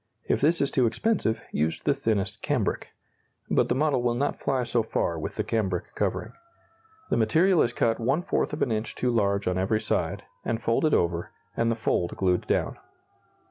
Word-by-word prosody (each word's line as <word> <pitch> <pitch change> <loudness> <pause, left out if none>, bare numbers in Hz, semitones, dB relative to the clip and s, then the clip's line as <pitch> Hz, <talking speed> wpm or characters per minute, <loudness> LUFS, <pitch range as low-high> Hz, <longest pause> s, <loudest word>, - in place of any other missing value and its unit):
If - - +1
this 165 +4 +3
is 140 - +2
too 125 -3 +3
expensive, 115 - 0
use 80 +2 0
the 145 - +1
thinnest 110 -8 -1
cambric. - - -1 0.6
But - - +3
the 120 - +2
model 145 -2 +2
will 120 -1 +1
not 140 +4 0
fly 130 -2 -1
so 120 0 +1
far 85 -6 -1
with 80 - -5
the - - -1
cambric 95 -6 -2
covering. - - -2 0.8
The - - +3
material 165 - +4
is 120 - +2
cut 115 -1 +1
one 135 +9 +1
fourth - - 0
of 150 - -1
an 125 - -1
inch 110 +1 -2
too 125 - 0
large 100 -3 +1
on 90 0 +1
every 105 +3 +1
side, - - -1 0.2
and 115 - -1
folded 115 +7 +2
over, 85 0 0 0.3
and 115 0 +1
the 115 - +1
fold 90 -6 -1
glued 90 -2 +1
down. - - 0
115 Hz, 190 wpm, -26 LUFS, 100-135 Hz, 0.8 s, material